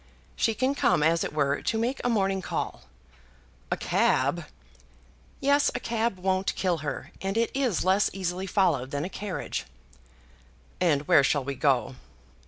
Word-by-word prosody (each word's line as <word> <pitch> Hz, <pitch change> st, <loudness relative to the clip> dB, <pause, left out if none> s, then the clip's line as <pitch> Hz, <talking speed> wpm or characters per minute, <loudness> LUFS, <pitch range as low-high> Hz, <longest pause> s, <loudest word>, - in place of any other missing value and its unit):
She 225 Hz, -, +1 dB
can 260 Hz, +4 st, +1 dB
come, 180 Hz, -, +2 dB
as 165 Hz, +1 st, +3 dB
it -, -, -3 dB
were, 145 Hz, -1 st, 0 dB
to 225 Hz, -, -1 dB
make 240 Hz, +4 st, -1 dB
a 245 Hz, -, +1 dB
morning 195 Hz, -4 st, +1 dB
call." -, -, -4 dB, 0.8 s
"A -, -, 0 dB
cab!" 145 Hz, +6 st, +1 dB, 0.9 s
"Yes; 285 Hz, 0 st, +3 dB
a -, -, -1 dB
cab 230 Hz, -3 st, -1 dB
won't 190 Hz, +1 st, 0 dB
kill 180 Hz, -3 st, 0 dB
her, 145 Hz, -1 st, -5 dB
and 195 Hz, +2 st, -2 dB
it 230 Hz, 0 st, +1 dB
is 255 Hz, -, 0 dB
less 190 Hz, +2 st, +3 dB
easily 185 Hz, 0 st, -3 dB
followed 165 Hz, -10 st, +1 dB
than 145 Hz, +2 st, -2 dB
a -, -, -4 dB
carriage." 200 Hz, -1 st, -4 dB, 1.1 s
"And 150 Hz, -5 st, +1 dB
where 140 Hz, -, +6 dB
shall 145 Hz, -1 st, +1 dB
we 140 Hz, +2 st, -3 dB
go?" 130 Hz, -2 st, +1 dB
185 Hz, 160 wpm, -27 LUFS, 150-220 Hz, 1.1 s, where